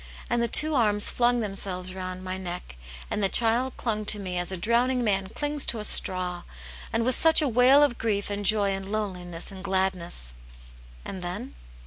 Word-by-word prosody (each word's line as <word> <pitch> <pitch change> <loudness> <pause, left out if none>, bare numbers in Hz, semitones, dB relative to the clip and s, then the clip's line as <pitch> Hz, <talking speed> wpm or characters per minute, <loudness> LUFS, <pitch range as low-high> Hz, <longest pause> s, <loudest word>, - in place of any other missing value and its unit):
And 240 0 +1
the 235 - +1
two 305 +6 +1
arms 210 -6 +2
flung 245 0 +1
themselves 190 -3 -1
round 185 0 -6
my 185 0 -4
neck, 180 - -7 0.4
and - - -1
the 195 - +1
child 240 +4 +1
clung 215 -3 -2
to 210 - +2
me 185 -3 -4
as 175 +1 -1
a 190 - -4
drowning 240 +6 +1
man 195 -3 0
clings 290 +7 -2
to 230 - +3
a - - -5
straw, 180 -3 +2 0.5
and 230 0 0
with 255 - +2
such 320 +5 +6
a 305 - +2
wail 255 +4 +5
of 265 -5 0
grief 205 -2 -2
and 205 0 -3
joy 205 0 +2
and 195 0 -5
loneliness 180 -5 -5
and 190 -1 -9
gladness." 185 - 0 0.7
"And 190 - -6
then?" 185 +9 -6
205 Hz, 190 wpm, -26 LUFS, 185-235 Hz, 0.7 s, such